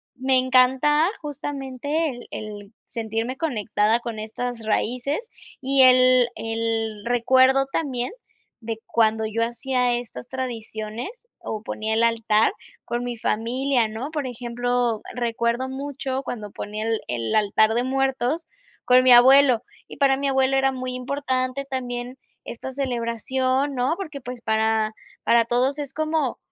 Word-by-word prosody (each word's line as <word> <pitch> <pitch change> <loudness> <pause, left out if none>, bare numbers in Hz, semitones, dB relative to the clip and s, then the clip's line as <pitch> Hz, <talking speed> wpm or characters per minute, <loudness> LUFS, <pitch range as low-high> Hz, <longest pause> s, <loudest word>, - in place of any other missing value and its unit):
me 260 0 +2
encanta 260 +5 +4
justamente 290 +1 -3
el 245 -1 -10
el 210 0 -8
sentirme 225 +2 -3
conectada 225 -6 +1
con 230 -2 -6
estas 230 +2 -5
raíces 250 +6 0 0.4
y 270 0 +4
el 255 -1 +6
el 225 -1 -2
recuerdo 260 +3 +4
también 255 -4 -1 0.5
de 225 0 -5
cuando 220 -1 +2
yo 225 +1 -1
hacía 250 +1 0
estas 220 - -7
tradiciones 240 - -6
o 215 -1 -5
ponía 220 0 -2
el 230 - +3
altar 225 - +3 0.3
con 240 +1 -2
mi 245 -1 -4
familia, 240 +2 0
¿no?, 225 +7 -5
por 295 -4 -3
ejemplo, 245 -1 -1
recuerdo 235 +1 -1
mucho 270 0 -4
cuando 210 -4 -6
ponía 215 +1 -5
el 225 -1 0
el 115 - -1
altar 215 +1 +3
de 240 +1 +1
muertos 270 +4 0 0.4
con 255 0 +6
mi 255 - +6
abuelo 255 0 +7 0.3
y - - -10
para 275 -1 +4
mi 280 +1 -2
abuelo 265 0 +2
era 270 0 +3
muy 255 -1 -4
importante 260 0 -2
también 250 -1 -4 0.3
esta 265 +3 -7
celebración, 260 +2 -1
¿no?, 255 +6 +1
porque 310 -8 -6
pues, 245 -1 -8
para 220 0 +1 0.3
para 235 0 +4
todos 255 +4 +1
es 280 -2 -5
como 310 -4 -1
245 Hz, 140 wpm, -23 LUFS, 225-265 Hz, 0.5 s, abuelo